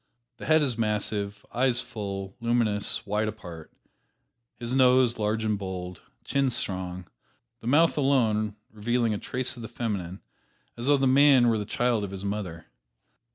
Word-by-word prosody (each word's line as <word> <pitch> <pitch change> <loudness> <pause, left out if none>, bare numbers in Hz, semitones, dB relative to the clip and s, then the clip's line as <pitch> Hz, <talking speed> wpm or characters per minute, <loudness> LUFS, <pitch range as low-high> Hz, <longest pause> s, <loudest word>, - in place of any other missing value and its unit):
The - - -8
head 155 -1 +5
is 125 -5 -1
massive, 105 -1 -1
eyes 125 0 +2
full, 100 -6 -5
luminous, 115 -3 +1
wide 105 +1 0
apart, 90 -7 -8 0.9
his 120 +1 -3
nose 130 -2 +4
large 110 +1 0
and 105 -2 0
bold, 90 -3 -6 0.2
chin 140 -1 +1
strong, 95 -6 -3 0.5
the 115 - -9
mouth 160 +6 +4
alone 110 -7 +2 0.2
revealing 115 +1 0
a 105 - -3
trace 130 0 -3
of 120 - -10
the 115 - -6
feminine, 100 -6 -4 0.6
as 120 +2 -5
though 145 0 +5
the 135 - +1
man 135 -2 +6
were 110 -2 +1
the 105 - -3
child 120 -1 +1
of 100 - -4
his 95 +1 -6
mother. 95 -6 -4
110 Hz, 155 wpm, -27 LUFS, 100-125 Hz, 0.9 s, man